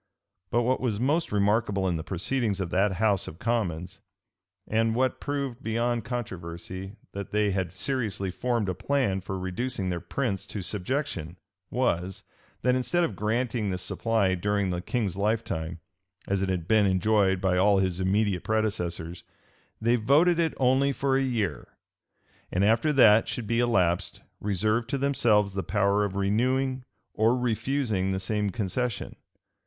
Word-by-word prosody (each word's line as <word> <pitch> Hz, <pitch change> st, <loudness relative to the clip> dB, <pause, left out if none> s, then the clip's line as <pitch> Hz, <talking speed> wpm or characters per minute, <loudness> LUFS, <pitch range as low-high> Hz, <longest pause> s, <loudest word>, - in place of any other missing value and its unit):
But 120 Hz, +1 st, +2 dB
what 130 Hz, +2 st, +1 dB
was 115 Hz, -5 st, -1 dB
most 150 Hz, +7 st, +1 dB
remarkable 100 Hz, -1 st, +1 dB
in 90 Hz, -, 0 dB
the 80 Hz, -, -3 dB
proceedings 100 Hz, +4 st, -1 dB
of 90 Hz, -3 st, -3 dB
that 95 Hz, +2 st, +2 dB
house 100 Hz, 0 st, +1 dB
of 80 Hz, -, -8 dB
commons, 95 Hz, -5 st, -2 dB, 0.7 s
and 115 Hz, +1 st, +1 dB
what 130 Hz, +1 st, +1 dB
proved 140 Hz, -3 st, -3 dB
beyond 115 Hz, 0 st, -1 dB
controversy 95 Hz, -4 st, -6 dB, 0.2 s
that 100 Hz, -1 st, -6 dB
they 105 Hz, -1 st, +1 dB
had 95 Hz, -3 st, -1 dB
seriously 100 Hz, -2 st, -2 dB
formed 120 Hz, 0 st, -1 dB
a 95 Hz, -, 0 dB
plan 105 Hz, -2 st, 0 dB
for 95 Hz, +1 st, -5 dB
reducing 95 Hz, +2 st, -3 dB
their 90 Hz, -1 st, -2 dB
prince 100 Hz, +3 st, -3 dB
to 100 Hz, -, -5 dB
subjection, 90 Hz, -, -3 dB, 0.3 s
was, 95 Hz, -7 st, -1 dB, 0.4 s
that 125 Hz, -, +3 dB
instead 130 Hz, +8 st, +1 dB
of 110 Hz, -, -1 dB
granting 110 Hz, +2 st, -1 dB
this 90 Hz, -1 st, -3 dB
supply 105 Hz, 0 st, +1 dB
during 100 Hz, +1 st, 0 dB
the 90 Hz, 0 st, -2 dB
king's 105 Hz, -2 st, -2 dB
lifetime, 100 Hz, -6 st, -1 dB, 0.5 s
as 100 Hz, -1 st, 0 dB
it 95 Hz, -, 0 dB
had 90 Hz, -3 st, -2 dB
been 110 Hz, -2 st, +4 dB
enjoyed 95 Hz, 0 st, +2 dB
by 95 Hz, -1 st, +1 dB
all 100 Hz, +2 st, +4 dB
his 95 Hz, -2 st, 0 dB
immediate 95 Hz, 0 st, +1 dB
predecessors, 90 Hz, -6 st, -2 dB, 0.6 s
they 115 Hz, +2 st, +2 dB
voted 155 Hz, +9 st, +4 dB
it 165 Hz, -2 st, +1 dB
only 135 Hz, +2 st, +3 dB
for 135 Hz, 0 st, 0 dB
a 135 Hz, -, +3 dB
year; 110 Hz, -, -2 dB, 0.7 s
and, 95 Hz, +2 st, +2 dB
after 115 Hz, +8 st, +3 dB
that 115 Hz, -6 st, +6 dB
should 120 Hz, -, -3 dB
be 115 Hz, +3 st, 0 dB
elapsed, 95 Hz, -8 st, +1 dB, 0.2 s
reserved 110 Hz, +4 st, 0 dB
to 140 Hz, -, 0 dB
themselves 115 Hz, -7 st, +2 dB
the 95 Hz, -, -1 dB
power 100 Hz, +1 st, +1 dB
of 100 Hz, -2 st, -2 dB
renewing 130 Hz, +6 st, 0 dB, 0.3 s
or 115 Hz, +3 st, +3 dB
refusing 120 Hz, -4 st, 0 dB
the 95 Hz, -, -1 dB
same 105 Hz, +1 st, -1 dB
concession. 115 Hz, +2 st, -3 dB
105 Hz, 155 wpm, -27 LUFS, 95-120 Hz, 0.7 s, that